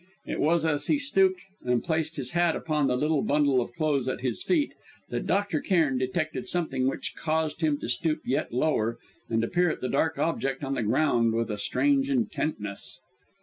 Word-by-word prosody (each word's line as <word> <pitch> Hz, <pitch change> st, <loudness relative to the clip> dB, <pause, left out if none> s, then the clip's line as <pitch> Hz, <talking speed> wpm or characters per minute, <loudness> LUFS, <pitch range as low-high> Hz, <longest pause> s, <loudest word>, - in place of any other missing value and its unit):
It -, -, -4 dB
was 165 Hz, +1 st, +2 dB
as 145 Hz, -2 st, 0 dB
he -, -, +3 dB
stooped 195 Hz, -10 st, +2 dB, 0.2 s
and 125 Hz, -1 st, +1 dB
placed 160 Hz, -1 st, -1 dB
his 130 Hz, -4 st, -3 dB
hat 175 Hz, -1 st, +2 dB
upon 150 Hz, -3 st, 0 dB
the 125 Hz, -, +1 dB
little 150 Hz, +1 st, +1 dB
bundle 140 Hz, -3 st, +3 dB
of 120 Hz, -, -5 dB
clothes 145 Hz, -5 st, 0 dB
at 130 Hz, -, -2 dB
his 125 Hz, -3 st, -2 dB
feet 315 Hz, -5 st, +1 dB, 0.4 s
that -, -, -3 dB
Dr. 200 Hz, -6 st, +1 dB
Cairn 155 Hz, -9 st, +2 dB
detected 155 Hz, +8 st, -2 dB
something 145 Hz, -8 st, 0 dB
which 135 Hz, -, -3 dB
caused 160 Hz, 0 st, -1 dB
him 155 Hz, -2 st, +2 dB
to -, -, -4 dB
stoop 155 Hz, +6 st, 0 dB
yet 140 Hz, +5 st, -1 dB
lower 120 Hz, -4 st, +1 dB, 0.3 s
and 115 Hz, 0 st, +1 dB
to -, -, 0 dB
peer 180 Hz, +3 st, +2 dB
at -, -, -3 dB
that 130 Hz, -, -2 dB
dark 160 Hz, +4 st, +1 dB
object 135 Hz, -4 st, -1 dB
on 135 Hz, 0 st, -2 dB
the -, -, -1 dB
ground 115 Hz, 0 st, +2 dB
with 115 Hz, -1 st, -1 dB
a 105 Hz, -, -4 dB
strange 275 Hz, -, +1 dB
intentness. 155 Hz, -, -2 dB
150 Hz, 195 wpm, -27 LUFS, 130-170 Hz, 0.4 s, he